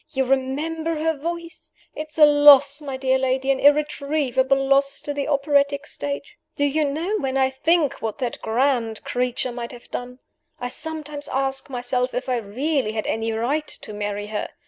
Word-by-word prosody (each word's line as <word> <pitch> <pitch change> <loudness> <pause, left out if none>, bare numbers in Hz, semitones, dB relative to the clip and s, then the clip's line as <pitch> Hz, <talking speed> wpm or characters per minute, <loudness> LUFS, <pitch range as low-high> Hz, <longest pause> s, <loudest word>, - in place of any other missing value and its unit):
You 265 -2 0
remember 300 +5 -1
her 320 0 +1
voice? 335 +3 -6 0.2
It's 305 0 -7
a 305 - +9
loss, 290 -1 +7
my 275 -3 -5
dear 265 0 +1
lady, 265 +1 +1
an 265 - 0
irretrievable 285 -2 +2
loss, 275 0 +3
to 290 - -4
the 285 -1 -3
operatic 280 -1 +1
stage! 280 -1 -5 0.2
Do 285 - +1
you 300 +2 +1
know, 335 +9 -1
when 270 0 -1
I 265 0 +2
think 310 +2 +1
what 220 -2 -3
that 250 -4 -4
grand 230 -1 0
creature 250 0 -1
might 240 -1 -5
have 240 - -14
done, 250 0 -5 0.4
I 245 -1 -3
sometimes 300 0 -4
ask 270 +1 -1
myself 250 0 -1
if 255 +1 -3
I 250 - +1
really 240 +3 -1
had 215 -1 -3
any 225 +1 -1
right 260 +8 -1
to 215 - -8
marry 205 0 -3
her. 210 0 -3
275 Hz, 175 wpm, -23 LUFS, 250-295 Hz, 0.4 s, a